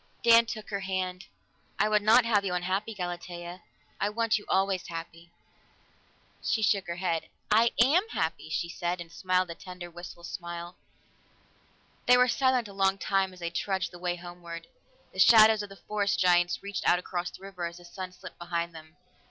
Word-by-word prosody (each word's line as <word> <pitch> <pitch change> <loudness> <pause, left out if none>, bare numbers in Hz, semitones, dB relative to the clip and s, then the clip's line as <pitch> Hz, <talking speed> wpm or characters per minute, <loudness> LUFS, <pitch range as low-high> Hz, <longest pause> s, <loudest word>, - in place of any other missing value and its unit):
Dan 230 0 +7
took 215 -2 -6
her 200 - -1
hand. 185 -1 -3 0.5
"I 210 - +3
would 210 -1 +3
not 225 +3 +6
have 210 -3 +3
you 185 -2 -1
unhappy, 190 +5 -2
Galatea. 175 -1 -6 0.4
I 205 - +1
want 225 0 +1
you 205 - -14
always 190 -1 +1
happy." 165 0 -8 1.1
She 220 - +1
shook 200 -2 +2
her 170 - -3
head. 170 -3 -1 0.2
"I 225 +2 +5
am 325 - +4
happy," 160 - -2
she 160 +2 -1
said, 175 +1 -3
and 170 -1 -8
smiled 185 0 0
a - - -4
tender, 180 0 -9
wistful 175 0 -10
smile. 170 0 -6 1.3
They 250 - +7
were 250 0 +5
silent 255 -2 +2
a 200 - -11
long 195 0 +2
time 195 0 +1
as 180 -1 -15
they 170 0 -3
trudged 190 +2 -1
the 175 - -11
way 175 0 -1
homeward. 175 -1 -9 0.5
The - - -8
shadows 220 -1 +7
of 205 - -7
the 195 - -11
forest 205 0 -1
giants 175 0 +3
reached 200 -1 -1
out 180 - +5
across 180 0 -3
the 190 - -14
river 185 -3 -5
as 170 0 -9
the 175 - -14
sun 185 +1 -7
slipped 180 0 -12
behind 170 0 -3
them. 155 -1 -13
185 Hz, 185 wpm, -29 LUFS, 175-205 Hz, 1.3 s, Dan